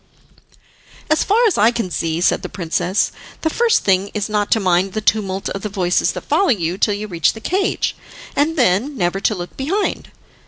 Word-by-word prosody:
"As 310 Hz, -, +3 dB
far 455 Hz, +4 st, +3 dB
as 415 Hz, -, +2 dB
I 215 Hz, +3 st, +6 dB
can 230 Hz, -6 st, -3 dB
see," 165 Hz, 0 st, -2 dB
said -, -, +2 dB
the -, -, -6 dB
princess, 180 Hz, +2 st, -1 dB, 0.3 s
"the 320 Hz, -, 0 dB
first 470 Hz, +3 st, +2 dB
thing 195 Hz, 0 st, +2 dB
is 210 Hz, 0 st, -2 dB
not 210 Hz, -1 st, 0 dB
to 225 Hz, -, +3 dB
mind 185 Hz, 0 st, +1 dB
the 215 Hz, -, -1 dB
tumult 195 Hz, -3 st, 0 dB
of 195 Hz, -, -5 dB
the 210 Hz, -, -4 dB
voices 180 Hz, -3 st, +1 dB
that -, -, -5 dB
follow 390 Hz, -2 st, +1 dB
you 180 Hz, -5 st, 0 dB
till 205 Hz, -, +2 dB
you 210 Hz, +1 st, -5 dB
reach 170 Hz, -5 st, +1 dB
the 220 Hz, -, -9 dB
cage, 380 Hz, -, -1 dB, 0.4 s
and 300 Hz, +3 st, +1 dB
then 250 Hz, +4 st, +1 dB
never 180 Hz, -1 st, 0 dB
to 210 Hz, +2 st, +1 dB
look 175 Hz, -1 st, -7 dB
behind. 360 Hz, +10 st, -2 dB
205 Hz, 200 wpm, -19 LUFS, 185-275 Hz, 0.4 s, I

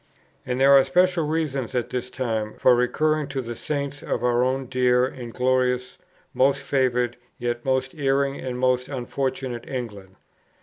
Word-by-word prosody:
And 125 Hz, 0 st, -1 dB
there 135 Hz, +1 st, +6 dB
are 135 Hz, -1 st, +8 dB
special 175 Hz, +3 st, +2 dB
reasons 140 Hz, -6 st, -2 dB
at 125 Hz, -, -1 dB
this 125 Hz, 0 st, -3 dB
time 110 Hz, -4 st, -3 dB
for 130 Hz, -, +5 dB
recurring 155 Hz, +5 st, +1 dB
to 140 Hz, -1 st, -4 dB
the 120 Hz, -2 st, -4 dB
Saints 140 Hz, +2 st, -3 dB
of 120 Hz, -, -3 dB
our 120 Hz, 0 st, +3 dB
own 130 Hz, +1 st, 0 dB
dear 125 Hz, -1 st, +2 dB
and 125 Hz, -2 st, -7 dB
glorious, 125 Hz, 0 st, 0 dB, 0.3 s
most 135 Hz, +2 st, +3 dB
favoured, 125 Hz, -3 st, +1 dB, 0.2 s
yet 120 Hz, -1 st, -3 dB
most 130 Hz, 0 st, 0 dB
erring 140 Hz, -1 st, 0 dB
and 125 Hz, -1 st, -4 dB
most 125 Hz, 0 st, +1 dB
unfortunate 130 Hz, -2 st, -3 dB
England. 105 Hz, -7 st, -6 dB
130 Hz, 160 wpm, -24 LUFS, 125-135 Hz, 0.3 s, are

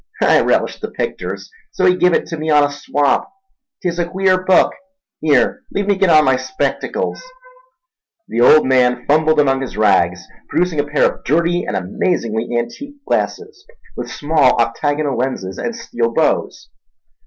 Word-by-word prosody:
I -, -, +5 dB
relished -, -, 0 dB
the -, -, -4 dB
picters, -, -, -5 dB, 0.2 s
so 185 Hz, -, -1 dB
he 180 Hz, 0 st, +4 dB
give 180 Hz, 0 st, +3 dB
it -, -, -1 dB
in 155 Hz, 0 st, -4 dB
on 150 Hz, -1 st, +5 dB
a 145 Hz, -, 0 dB
swap. 145 Hz, -, -1 dB, 0.5 s
'Tis 175 Hz, -1 st, -2 dB
a 175 Hz, 0 st, -1 dB
queer 185 Hz, 0 st, +1 dB
book—here, 255 Hz, -, 0 dB
leave 200 Hz, -, -2 dB
me 200 Hz, 0 st, +2 dB
git 190 Hz, -1 st, +1 dB
on 155 Hz, -2 st, +5 dB
my 130 Hz, -1 st, +3 dB
spectacles—" 390 Hz, -, -3 dB, 1.1 s
The 120 Hz, -, -2 dB
old 155 Hz, +5 st, +6 dB
man 125 Hz, -2 st, +2 dB
fumbled 155 Hz, +1 st, +2 dB
among 135 Hz, -2 st, +2 dB
his 130 Hz, -, -6 dB
rags, 95 Hz, -4 st, +2 dB, 0.2 s
producing 175 Hz, -3 st, 0 dB
a 145 Hz, -, 0 dB
pair 145 Hz, +1 st, +2 dB
of -, -, -2 dB
dirty 170 Hz, +5 st, 0 dB
and -, -, -2 dB
amazingly 110 Hz, -, -2 dB
antique 280 Hz, -, -5 dB
glasses 430 Hz, -2 st, -3 dB, 0.3 s
with -, -, -6 dB
small 150 Hz, -2 st, +2 dB
octagonal 145 Hz, +4 st, 0 dB
lenses 120 Hz, -8 st, -3 dB
and 235 Hz, -, -3 dB
steel 120 Hz, -, -3 dB
bows. -, -, -1 dB
150 Hz, 155 wpm, -17 LUFS, 130-185 Hz, 1.1 s, old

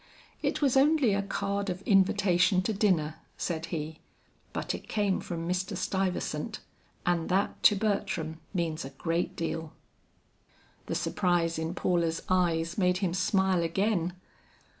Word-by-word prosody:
"It -, -, -1 dB
was 275 Hz, -2 st, +3 dB
only 275 Hz, -4 st, +4 dB
a 200 Hz, -, +1 dB
card 200 Hz, 0 st, -2 dB
of 185 Hz, +2 st, -4 dB
invitation 190 Hz, -2 st, +3 dB
to 220 Hz, -, 0 dB
dinner," 180 Hz, -7 st, +1 dB, 0.2 s
said 165 Hz, -1 st, -2 dB
he, 160 Hz, -1 st, -4 dB, 0.5 s
"but -, -, -2 dB
it -, -, -8 dB
came 205 Hz, -3 st, +1 dB
from 165 Hz, -1 st, -5 dB
Mr. 185 Hz, +2 st, -1 dB
Stuyvesant, 185 Hz, -5 st, -2 dB, 0.5 s
and 175 Hz, -2 st, +1 dB
that 190 Hz, +2 st, 0 dB
to 210 Hz, -, +6 dB
Bertram 195 Hz, -6 st, -1 dB
means 170 Hz, -4 st, -1 dB
a 135 Hz, -, -6 dB
great 165 Hz, +4 st, -2 dB
deal." 165 Hz, -1 st, -3 dB, 1.1 s
The -, -, -2 dB
surprise 170 Hz, -3 st, +1 dB
in 160 Hz, +2 st, -3 dB
Paula's 170 Hz, -2 st, 0 dB
eyes 170 Hz, -1 st, +1 dB
made 180 Hz, -1 st, +3 dB
him 185 Hz, -3 st, -1 dB
smile 190 Hz, 0 st, +2 dB
again. 180 Hz, +1 st, 0 dB
180 Hz, 140 wpm, -29 LUFS, 165-200 Hz, 1.1 s, to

